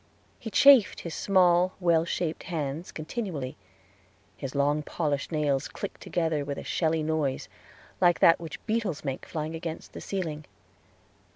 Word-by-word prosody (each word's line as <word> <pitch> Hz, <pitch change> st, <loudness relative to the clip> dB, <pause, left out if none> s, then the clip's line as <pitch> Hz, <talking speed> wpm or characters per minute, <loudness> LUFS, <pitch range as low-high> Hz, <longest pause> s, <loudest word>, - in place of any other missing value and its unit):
He 225 Hz, -, -6 dB
chafed 275 Hz, -2 st, +6 dB
his 170 Hz, -, -6 dB
small, 180 Hz, -1 st, +3 dB
well 170 Hz, -3 st, +3 dB
shaped 170 Hz, -1 st, -2 dB
hands 155 Hz, 0 st, -4 dB
continually; 155 Hz, -, -4 dB, 0.8 s
his 135 Hz, +1 st, -6 dB
long 145 Hz, +2 st, +2 dB
polished 150 Hz, -2 st, -2 dB
nails 145 Hz, -3 st, 0 dB
clicked 200 Hz, -, -7 dB
together 160 Hz, -4 st, -1 dB
with 140 Hz, 0 st, -4 dB
a -, -, -6 dB
shelly 160 Hz, -2 st, 0 dB
noise, 155 Hz, -4 st, -1 dB, 0.5 s
like 175 Hz, -1 st, +5 dB
that 165 Hz, -, +6 dB
which 165 Hz, -2 st, -8 dB
beetles 215 Hz, -9 st, -1 dB
make 135 Hz, -1 st, -4 dB
flying 155 Hz, 0 st, -4 dB
against 165 Hz, 0 st, -6 dB
the -, -, -8 dB
ceiling. 160 Hz, -6 st, -4 dB
160 Hz, 145 wpm, -28 LUFS, 150-180 Hz, 0.8 s, chafed